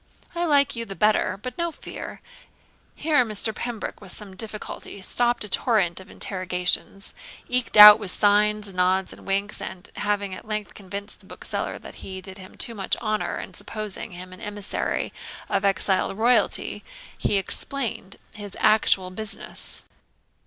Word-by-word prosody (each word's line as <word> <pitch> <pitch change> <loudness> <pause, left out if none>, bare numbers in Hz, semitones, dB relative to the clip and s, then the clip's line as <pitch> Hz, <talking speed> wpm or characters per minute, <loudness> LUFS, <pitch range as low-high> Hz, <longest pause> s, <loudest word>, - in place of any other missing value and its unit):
I 345 0 0
like 285 -5 +4
you 230 - -2
the 195 -4 -7
better; 210 -1 +2
but 250 +3 -6
no 340 0 0
fear.' - - -8 0.7
Here 300 -4 +3
Mr. 220 0 -2
Pembroke 235 -1 -5
with 190 -3 -7
some 195 -1 -6
difficulty 215 0 -6
stopt 240 +5 +1
a - - -5
torrent 200 -6 +2
of 190 - -13
interrogations, 185 +1 -1 0.3
eked 250 -3 +1
out 210 0 +13
with 205 -3 -4
signs, 210 +1 +3
nods, 185 +1 +1
and - - -15
winks; 200 +2 0
and, 185 -1 -7
having 205 -2 -1
at 185 - -9
length 215 -1 -3
convinced 200 +1 -7
the - - -19
bookseller - - -4
that - - -11
he 190 -1 -6
did 190 +1 -8
him 185 0 -12
too 235 - +1
much 195 -4 -1
honour 215 -2 -1
in - - -8
supposing 215 -4 -5
him 185 +1 -8
an 185 - -13
emissary 205 -1 -2 0.3
of - - 0
exiled 195 0 +2
royalty, 240 +3 +2 0.3
he 205 - +1
explained 225 0 -2 0.2
his 205 -2 -8
actual 195 -3 +4
business. 215 +3 -5
205 Hz, 155 wpm, -25 LUFS, 190-220 Hz, 0.7 s, out